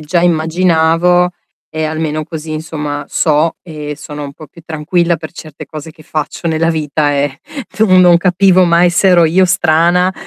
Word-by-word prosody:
già 155 +3 -1
immaginavo 170 +1 +2 0.4
e 155 0 -4
almeno 155 0 -3
così 155 0 -7
insomma 150 -2 -5
so 155 +1 +1
e 150 -3 -7
sono 150 0 -8
un 140 - -8
po' 155 - -12
più 170 - -17
tranquilla 170 +2 -1
per 155 +1 -10
certe 155 -3 -10
cose 155 +1 -9
che 155 0 -18
faccio 155 +3 -5
nella 165 +1 0
vita, 150 -2 -1
ehm, 140 -1 -1 0.3
tu 220 - 0
non 175 -1 +5
capivo 185 +1 +3
mai 170 +1 +3
se 175 +3 +2
ero 175 -2 +5
io 180 +4 +3
strana 175 +2 +2
160 Hz, 170 wpm, -14 LUFS, 155-175 Hz, 0.4 s, non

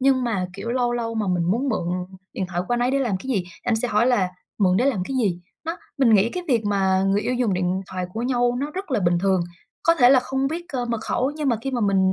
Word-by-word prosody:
Nhưng 260 -1 +3
mà, 195 -6 -1
kiểu, 200 +5 -5
lâu 245 -1 +1
lâu 230 -1 -2
mà 215 -2 -1
mình 175 -2 +1
muốn 250 +7 0
mượn 175 -7 -1 0.4
điện 190 - -3
thoại 175 0 -2
của 240 - +2
anh 240 - -1
ấy 245 +1 +2
để 275 - +1
làm 235 -8 0
cái 260 - -10
gì, 195 -7 0 0.2
anh 240 -2 +1
sẽ 245 +2 -1
hỏi 215 +3 +3
là 205 -8 +3 0.3
"Mượn 185 -2 +3
để 250 - +2
làm 220 -10 +1
cái 265 - -3
gì?" 190 -8 0 0.2
Đó, 330 +2 -3 0.2
mình 235 -5 +5
nghĩ 210 +3 +4
cái 360 - -4
việc 230 -4 +2
mà 190 -2 +2
người 200 +1 +2
yêu 250 - -1
dùng 240 -6 +1
điện 180 +1 0
thoại 185 -1 -3
của 230 - -2
nhau 245 -1 +1
nó 290 +2 -2
rất 370 -1 -6
là 240 - +1
bình 175 -1 +2
thường. 190 -1 +2 0.4
Có 335 - +4
thể 250 -5 +6
là 260 -2 +6
không 265 +1 -1
biết, 335 +3 -4
ơ, 250 -2 -1
mật 235 -2 -2
khẩu, 260 +3 0
nhưng 300 -3 -1
mà 235 - +2
khi 270 - -2
mà 245 -2 -1
mình 190 -2 +3
235 Hz, 285 wpm, -23 LUFS, 190-255 Hz, 0.4 s, thể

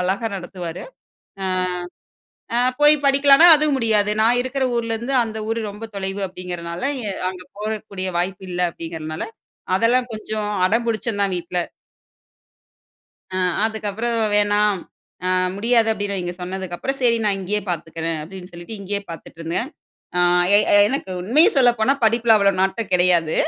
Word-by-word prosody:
அழகா 195 +5 -1
நடத்துவாரு. 175 -2 -7 1.7
ஆ - - +2 0.2
போய் 295 +1 +7
அ - - -16
படிக்கலனா 275 +3 +6
அதும் 300 -1 +1
முடியாது. 215 -4 +2
நான் 235 +3 +3
இருக்கிற 265 +1 -2
ஊரிலேருந்து 235 +3 -2
அந்த 220 -1 -6
ஊரு 230 - -1
ரொம்ப 210 +3 -8
தொலைவு 195 0 -4
அப்டிங்கிறனால 175 -1 -6 0.5
அங்க 180 -1 -9
போகக்கூடிய 210 -3 -4
வாய்ப்பு 185 +2 -2
இல்ல 180 0 -2
அப்டிங்கிறனால, 160 -2 -6 0.5
அதெல்லாம் 245 +5 +2
கொஞ்சம் 215 -1 -4 0.2
அடம் 230 +4 0
புடிச்சேன் 220 -2 -2
தான் 195 - 0
வீட்ல. 175 +1 -3 1.7
ஆ 185 - -1 0.3
அதுக்கப்பறம், 220 +1 -2 0.2
"வேணாம், 205 -1 +2 0.5
அ - - +1 0.3
முடியாது." 230 +1 +2
அப்டீனு 205 -1 -3
அவுங்க 175 -1 -4
சொன்னதுக்கப்பறம், 190 +8 -4
"சரி 235 -2 +3
நான் 200 -2 +1
இங்கேயே 205 +2 -1
பாத்துக்குறேன்" 165 -1 -3
அப்டீன்னு 185 +2 -10
சொல்லிட்டு 175 +6 -8
இங்கேயே 200 +1 -3
பாத்துட்ருந்தேன். 165 - -5 0.5
ஆ - - +4 0.4
எ - - +7 0.3
எனக்கு 260 -7 -3
உண்மையா 260 - +5
சொல்லப்போனா 245 0 +4
படிப்புல 230 0 +4
அவ்ளோ 200 -1 +4
நாட்டம் 195 +2 -1
கெடையாது. 175 -3 +3
205 Hz, 135 wpm, -21 LUFS, 180-230 Hz, 1.7 s, போய்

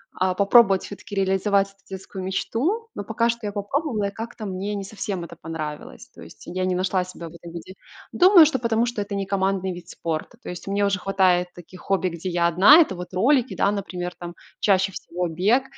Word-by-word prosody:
а, 185 0 0
попробовать 200 -1 +5
все-таки 200 0 -9
реализовать 195 +1 +2
эту 195 0 -25
детскую 190 0 -7
мечту, 295 - -1
но - - -5
пока 230 +3 0
что 235 -2 -3
я - - -3
попробовала, 210 +1 -2
и - - -11
как-то 225 0 -7
мне 195 +2 -3
не 200 - -4
совсем 195 -3 -5
это 170 0 -9
понравилось. 150 - -7
То - - -14
есть - - -13
я 185 +1 -3
не 185 -1 0
нашла 185 0 0
себя 180 -2 -9
в - - -16
этом 170 0 -11
виде. 170 +2 -9 0.4
Думаю, 360 -3 +7
что 275 -4 0
потому 230 0 +1
что 240 -3 -3
это 200 0 -4
не 195 0 -2
командный 190 -1 0
вид 175 0 -11
спорта. 165 +8 -5
То - - -8
есть 180 +2 -8
мне 200 +1 +1
уже 200 0 0
хватает 185 -2 +2
таких 175 +1 -13
хобби, 190 -2 0
где 170 +2 -5
я 170 -1 +1
одна. 195 - +7
Это 305 - +3
вот 180 +1 -8
ролики, 250 +6 +2
да, 200 - +2
например, 180 -3 -4
там 175 0 -7 0.2
чаще 195 -1 +2
всего 180 -1 -4
бег. 195 +11 +2
195 Hz, 215 wpm, -23 LUFS, 180-210 Hz, 0.4 s, Думаю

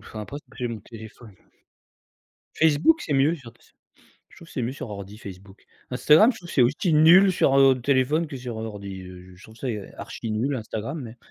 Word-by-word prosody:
enfin, 110 - -9
après 120 +7 -7 0.2
j'ai 120 -1 -3
mon 115 -3 -6
téléphone. 110 -1 -13 1.2
Facebook 160 - +3
c'est 150 - -3
mieux 140 +4 +3
j'ai 160 - -8
l'impression. 115 0 -17 0.5
Je - - -20
trouve 165 - -14
que - - -16
c'est 125 - -3
mieux 120 - -2
sur 130 - -8
ordi 100 +1 -8
Facebook. 95 0 -12 0.3
Instagram, 155 - +5
je - - -12
trouve 175 - -12
que - - -8
c'est 130 - +5
aussi 150 +7 +1
nul 175 +5 +6
sur, 135 -5 +2
heu, 135 -2 +5
téléphone 140 +5 +1
que 140 - -7
sur, 120 -3 -6
heu, - - -4
ordi, 100 -3 -8
heu, 90 0 -12
je 95 - -18
trouve 110 +1 -15
ça 130 - -6 0.3
archi 115 - -7
nul 125 +6 -1
Instagram 115 +5 -5
mais 120 -2 -9
125 Hz, 210 wpm, -24 LUFS, 110-150 Hz, 1.2 s, nul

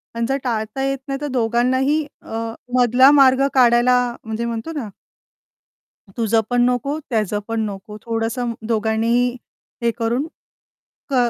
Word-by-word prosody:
आणि 230 0 -1
जर 270 - +1
टाळता 230 +1 -2
येत 275 0 0
नाही 275 0 -3
तर 295 - -2
दोघांनाही 260 +4 +1 0.2
अ, 225 - -8 0.4
मधला 250 +3 +6
मार्ग 275 -1 +5
काढायला 245 -1 +5 0.3
म्हणजे 220 +1 -4
म्हणतो 235 +7 -4
ना 240 -8 -4 1.3
तुझं 225 -1 +2
पण 245 0 +3
नको, 250 +4 0
त्याचं 210 -2 0
पण 225 0 -1
नको, 200 +2 -9
थोडंसं 230 +1 -2 0.2
दोघांनीही 230 +2 +1 0.5
हे 235 - +2
करून 240 +5 0 0.8
कर 245 -3 +2
240 Hz, 135 wpm, -20 LUFS, 225-260 Hz, 1.3 s, मधला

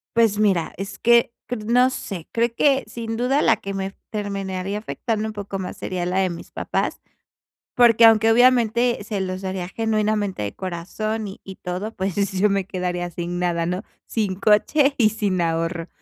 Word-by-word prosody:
Pues, 225 -3 +3
mira, 195 -6 +1
es 195 +2 -6
que, 235 0 +4
cr 225 -3 -4
no 250 +3 +4
sé, 195 -9 -6
creo 235 0 +1
que 275 -2 +3
sin 225 0 -5
duda 265 +5 +2
la 225 - +4
que 195 -2 -6
me 195 0 -4 0.2
terminaría 195 -2 -3
afectando 220 0 -3
un 215 - -6
poco 200 -1 -5
más 185 -1 -5
sería 180 -1 -3
la 185 +2 0
de 190 -1 +2
mis 170 - -8
papás, - - -2 0.7
porque 235 -2 +6
aunque, 225 0 +7
obviamente, 240 0 +4
se 205 -2 -3
los 185 0 -3
daría 185 -1 -3
genuinamente, 215 - 0
de 100 - -4
corazón 200 +5 -4
y 195 - -9
y 190 -1 -10
todo, 190 +5 -4
pues, 190 -2 -2 0.2
yo 195 +2 +2
me 195 -1 0
quedaría 180 -2 -3
sin 175 +1 -4
nada, 170 -2 0
¿no? 180 +3 -2 0.2
Sin 205 -5 -1
coche 275 +8 +3
y 220 -3 +5
sin 200 -4 -1
ahorro. 165 0 -1
205 Hz, 180 wpm, -22 LUFS, 185-225 Hz, 0.7 s, aunque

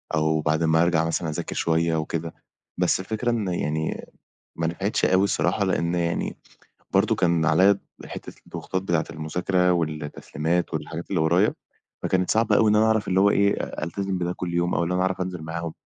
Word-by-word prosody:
أو 80 0 +1
بعد 80 +2 +1
ما 80 +1 +4
أرجع 85 -2 +2
مثلًا 85 0 -1
أذاكر 75 - -4
شوية 80 0 +1
وكده. 80 +1 -3 0.5
بس 90 +1 +2
الفكرة 110 +5 -2
إن 110 -4 -1
يعني 80 -3 -2 0.5
ما 85 0 -1
نفعِتِش 95 +5 -1
أوي 95 +2 +4
الصراحة، - - +1
لأن 85 +1 0
يعني، 85 -1 -1 0.6
برضه - - +3
كان 85 -2 +2
عليَّا 95 +5 +4 0.3
حتَّة - - -8
الضغوطات 95 0 -4
بتاعة 85 -4 0
المذاكرة 90 +3 0
والتسليمات 80 +1 -2
والحاجات 85 +1 -5
اللي 90 -5 +1
ورايا، 85 +6 +3 0.5
فكانت 90 -1 +1
صعبة 110 -2 +3
أوي 110 0 +4
إن - - +3
أنا 110 +1 +4
أعرف، 110 -1 +1
اللي 95 0 +2
هو 100 +1 +5
إيه، 100 0 +3
أ - - -5
ألتزِم 95 +3 -2
بده 90 0 -2
كل 90 -1 -5
يوم، 85 0 +1
أو 85 - +1
اللي 90 +2 -1
أنا 90 - +1
أعرَف 95 0 0
أنزِل 90 -3 -4
معاهم. 80 +1 -5
85 Hz, 185 wpm, -24 LUFS, 80-95 Hz, 0.6 s, هو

